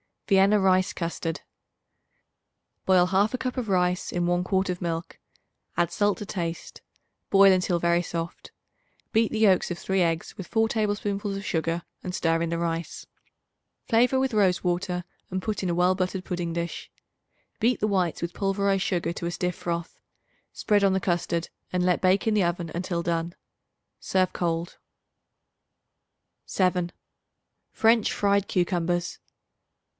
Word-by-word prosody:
Vienna 200 +1 +5
Rice 185 0 +3
Custard. 170 -1 -3 1.4
Boil 185 -2 +5
1/2 200 +6 +2
cup 255 +1 -4
of 245 -3 -2
rice 180 -2 0
in 175 -1 0
1 175 +1 +1
quart 190 0 0
of 180 -1 -3
milk; 170 0 -4 0.6
add 175 - +1
salt 205 -1 +1
to 210 - -5
taste; 170 -4 -5 0.5
boil 195 0 +7
until 180 -1 +2
very 170 0 +2
soft. 170 -1 -5 0.6
Beat 225 0 +2
the 220 - -2
yolks 195 -4 +4
of 175 - -3
3 190 +1 0
eggs 165 -1 -1
with 190 - -7
4 225 -1 +1
tablespoonfuls 205 -2 -1
of 195 +1 -6
sugar 165 0 -1 0.2
and 180 0 -5
stir 165 0 +1
in 170 - -1
the 170 - -1
rice. 165 0 -3 0.8
Flavor 245 +3 +4
with 265 -2 0
rose 195 -4 +2
water 180 0 -1 0.3
and 185 0 -2
put 215 +1 -2
in 185 - 0
a 170 - 0
well 180 +1 +3
buttered 185 0 -2
pudding 175 -2 -3
dish. 170 0 -4 0.7
Beat 235 +3 +1
the - - +3
whites 185 -5 0
with 170 0 -3
pulverized 195 -1 0
sugar 175 -3 -1
to 170 - -5
a 170 - -1
stiff 180 +1 -2
froth; 170 -1 -4 0.5
spread 205 -1 +1
on 195 -1 +4
the 190 - 0
custard 170 -1 -1 0.2
and 180 -1 +1
let 180 -1 +2
bake 185 +1 +3
in 220 - +2
the 210 -2 +3
oven 170 -1 -2
until 175 -1 -2
done. 170 0 -2 0.6
Serve 185 -1 +1
cold. 170 0 -2 1.7
7. 180 -2 0 0.8
French 225 -1 +3
Fried 200 -1 +1
Cucumbers. 175 -1 -1
180 Hz, 155 wpm, -26 LUFS, 170-200 Hz, 1.7 s, boil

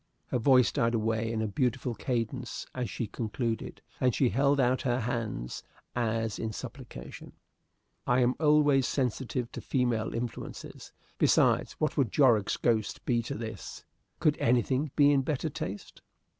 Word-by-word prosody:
Her 125 - 0
voice 130 +1 +5
died 115 +1 +1
away 110 0 0
in 110 -1 -1
a - - 0
beautiful 125 +4 -1
cadence 120 +1 -3
as 125 -4 -3
she 115 - -3
concluded, 115 +2 -4 0.2
and 125 -2 +2
she 130 - +3
held 140 +3 +2
out 130 0 +2
her 125 -1 0
hands 110 - -3 0.3
as 115 -2 -1
in 110 - -2
supplication. 65 -8 -9 0.7
I 125 +1 +3
am 125 +1 +3
always 150 -4 +4
sensitive 125 -1 -2
to - - -7
female 120 -4 0
influences. 115 0 -6 0.3
Besides, - - +3
what 155 - -2
would 130 -8 +2
Jorrocks' 120 -8 +3
ghost 110 -3 0
be 120 -1 +2
to 115 - -5
this? 110 -2 -7 0.4
Could 150 -2 +2
anything 130 +4 +2
be 145 -1 +6
in 140 -1 +4
better 150 +3 -2
taste? 100 -5 -6
120 Hz, 150 wpm, -29 LUFS, 115-130 Hz, 0.7 s, be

